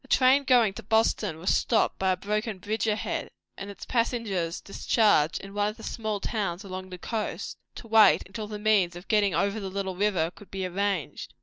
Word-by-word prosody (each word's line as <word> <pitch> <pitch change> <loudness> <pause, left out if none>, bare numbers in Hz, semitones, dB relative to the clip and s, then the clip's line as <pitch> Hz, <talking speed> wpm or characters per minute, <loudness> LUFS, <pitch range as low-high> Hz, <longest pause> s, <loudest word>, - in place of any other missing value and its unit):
A - - -19
train 265 +2 +4
going 240 -6 +4
to - - -8
Boston 220 -4 +1
was 180 +4 +1
stopped 225 -3 +1
by 190 -1 +2
a - - -4
broken 210 +2 -2
bridge 210 +4 -2
ahead, 215 0 -2 0.3
and 200 - -7
its 200 - -9
passengers 225 -8 -1
discharged 195 -6 +2
in 195 0 -10
one 205 0 +1
of 215 - -5
the 225 - -12
small 215 -2 -3
towns 195 -4 -3
along 185 -1 -7
the 180 - -7
coast, 220 +4 -4 0.2
to 230 - -10
wait 220 -1 +6
until 210 +2 -6
the 210 0 -6
means 205 -5 +2
of 175 +2 -10
getting 205 -5 +2
over 200 +5 0
the 195 -2 -5
little 190 -1 -3
river 180 -4 +1
could 205 - -16
be 190 -1 -4
arranged. 190 -2 -3
205 Hz, 205 wpm, -27 LUFS, 185-220 Hz, 0.3 s, wait